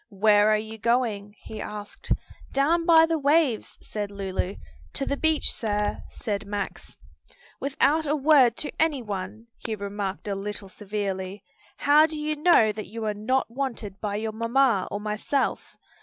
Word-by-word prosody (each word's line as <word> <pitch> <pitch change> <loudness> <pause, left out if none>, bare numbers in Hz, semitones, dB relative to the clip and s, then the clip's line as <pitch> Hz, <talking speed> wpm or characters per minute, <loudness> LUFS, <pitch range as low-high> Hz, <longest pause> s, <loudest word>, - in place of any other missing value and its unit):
"Where 210 +1 +4
are 215 - +4
you 220 +1 -7
going?" 220 -3 0
he 215 - -7
asked. 210 -1 -8 0.4
"Down 330 +5 +2
by 325 -1 +8
the 325 -1 0
waves," 285 -4 +2
said 205 -1 -4
Lulu. 195 -1 -3 0.4
"To 275 - -1
the - - 0
beach, 315 +1 +2
sir," 210 -2 -1
said 205 -3 -4
Max. 205 -1 -5 0.6
"Without 290 +3 +1
a 295 - +2
word 275 -5 +5
to 300 - -3
any 300 -6 +1
one!" 205 +1 -5
he 225 - -4
remarked 200 -1 -4
a 200 - -1
little 195 0 -5
severely. 195 -1 -4 0.3
"How 300 +2 +5
do 315 -1 -6
you 305 0 -1
know 300 -8 +5
that 215 0 -7
you 225 +1 -5
are 210 - 0
not 230 +4 0
wanted 235 -7 -4
by 205 -1 -2
your 220 +1 -2
mamma 230 -1 +2
or 205 - -3
myself? 215 +6 -2
220 Hz, 160 wpm, -26 LUFS, 205-275 Hz, 0.6 s, by